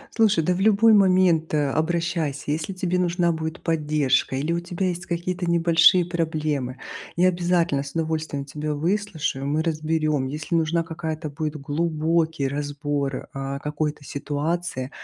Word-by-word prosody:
Слушай, 215 -7 +3
да 180 - +2
в 185 - -3
любой 220 +2 +5
момент, 185 -5 +4
э, 145 -2 +2
обращайся. 160 -2 -1
Если 160 +5 -2
тебе 180 0 -1
нужна 175 -1 +1
будет 160 +1 -4
поддержка 150 -5 +1
или 150 +5 -1
у 170 - 0
тебя 175 +2 -2
есть 180 +1 -4
какие-то 175 +1 -2
небольшие 170 +1 +5
проблемы, 155 -6 -2 0.4
я 180 +2 +5
обязательно 175 -5 +1
с 140 -1 -8
удовольствием 160 -3 -2
тебя 150 +2 -4
выслушаю. 160 -5 -1
Мы 150 +3 +1
разберем. 155 -3 0
Если 150 +5 -4
нужна 165 0 +2
какая-то 160 -1 -5
будет 155 +1 -3
глубокий 160 +1 0
разбор, 145 -1 -3
а, 135 0 -4
какой-то 150 0 -3
ситуации, 145 -1 -3
160 Hz, 145 wpm, -24 LUFS, 150-175 Hz, 0.4 s, любой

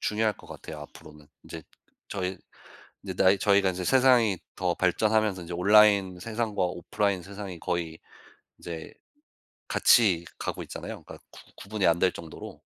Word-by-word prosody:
중요할 110 0 0
것 - - -16
같아요 75 - -9
앞으로는. 75 0 -14 0.2
인제 80 -2 -9 0.5
저희 95 -1 -3 0.7
이제 - - -5
나이 95 +1 +4
저희가 100 -2 +3
이제 90 0 -5
세상이 125 -6 +4 0.2
더 90 -2 0
발전하면서 105 +1 +1
이제 85 - -8
온라인 100 0 +4
세상과 110 -1 -2
오프라인 90 +2 -1
세상이 100 -3 -8
거의 85 -2 -3 0.6
이제 80 -2 -8 0.8
같이 95 -8 +4
가고 - - -4
있잖아요. - - -8
그니까 - - -11
구 - - -14 0.2
구분이 100 -1 -2
안 85 0 +3
될 95 - +4
정도로. 80 -2 -10
95 Hz, 340 characters per minute, -27 LUFS, 85-105 Hz, 0.8 s, 나이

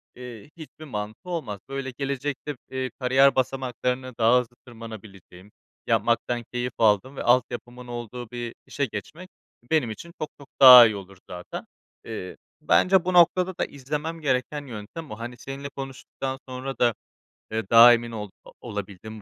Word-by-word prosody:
eee, 125 +1 -10
hiçbir 155 -1 -11
mantığı 110 - -6
olmaz. 125 - -4
Böyle, 135 -1 -4
gelecekte, 140 +1 -3
eee, 130 -1 -3
kariyer 135 +2 +4
basamaklarını 130 -1 -2
daha 115 +2 +5
hızlı 120 -1 -7
tırmanabileceğim, 105 -5 -12 0.4
yapmaktan 120 -1 +1
keyif 125 -1 -2
aldığım 110 +4 +2
ve - - -5
altyapımın 120 0 0
olduğu 120 0 -7
bir 120 -1 -5
işe 140 - -2
geçmek 155 - -8 0.4
benim 150 -8 +2
için 170 +10 -9
çok 155 - -2
çok 140 - -13
daha 125 -2 +12
iyi 110 - +1
olur 95 -1 -10
zaten. 90 0 -7 0.4
Eee, 105 -5 -7 0.2
bence 185 -1 +4
bu 185 - 0
noktada 180 +1 +4
da - - 0
izlemem 150 +4 -5
gereken 140 +1 -1
yöntem 120 +7 -8
o. 110 - -7
Hani, 120 +1 -7
seninle 140 +1 -7
konuştuktan 135 -1 -6
sonra 130 +1 -6
da, 120 -1 +4 0.6
eee, 110 -2 -3
daha 115 +1 +9
emin 120 0 -1
ol 105 -2 -6 0.3
olabildim 105 -1 -7
125 Hz, 150 wpm, -25 LUFS, 110-140 Hz, 0.6 s, daha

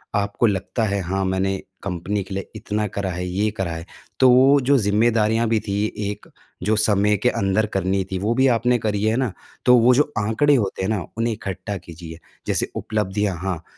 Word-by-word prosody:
आपको 100 +3 0
लगता 105 +3 -1
है 100 -2 0
हाँ, 95 +2 -2
मैंने 95 +1 0 0.3
कंपनी 100 +2 -2
के 95 - -9
लिए 95 0 -5
इतना 105 0 -2
करा 100 0 -3
है, 90 +1 -4
ये 100 +4 0
करा 95 -4 -2
है, 80 0 -6 0.3
तो 130 - +6
वो 135 +3 +6
जो 135 +2 +3
ज़िम्मेदारियाँ 110 +1 +2
भी 110 -1 +2
थी 100 +1 0
एक, 105 0 -4 0.4
जो 105 +4 +2
समय 105 -1 +2
के 125 +5 +2
अंदर 100 +3 +1
करनी 95 0 0
थी 95 - -1
वो 105 +5 0
भी 130 +2 +4
आपने 125 +2 +2
करी 105 -2 -2
है 110 +1 +2
ना, 130 -6 0 0.3
तो 125 - +7
वो 125 +2 +5
जो 150 +2 +2
आंकड़े 110 +7 +2
होते 100 -6 -1
हैं 95 - -1
ना, 110 -2 0 0.2
उन्हें 115 0 0
इकट्ठा 100 -1 -5
कीजिए, 85 -1 -10 0.3
जैसे - - 0
उपलब्धियाँ। 105 -3 -1
हाँ, 90 -4 -3
105 Hz, 200 wpm, -22 LUFS, 95-115 Hz, 0.4 s, तो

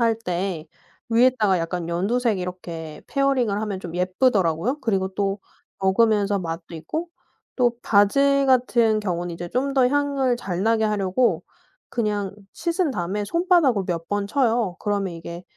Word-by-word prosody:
할 230 -1 +3
때 180 -5 -3 0.4
위에다가 230 -5 +3
약간 170 0 -3
연두색 210 +5 0
이렇게 170 -4 -6
페어링을 260 -7 +1
하면 200 -3 -3
좀 170 -2 -8
예쁘더라고요. 185 - +1
그리고 195 -6 0
또 200 0 -1 0.4
먹으면서 205 +1 +2
맛도 165 -1 -6
있고 315 - -4 0.5
또 245 -2 +3
바질 275 +7 +4
같은 235 -4 +3
경우는 175 -3 -3
이제 175 +1 -6
좀 270 +6 -1
더 260 -2 +4
향을 275 -3 +1
잘 190 -5 -4
나게 225 0 +2
하려고 210 +3 +1 0.5
그냥 205 -4 -2 0.2
씻은 340 -2 -1
다음에 205 0 -2
손바닥으로 335 - +2
몇 165 -2 -3
번 205 0 -1
쳐요. 230 -6 +1
그러면 200 -4 -1
이게 170 +1 -8
205 Hz, 310 characters per minute, -23 LUFS, 180-250 Hz, 0.5 s, 바질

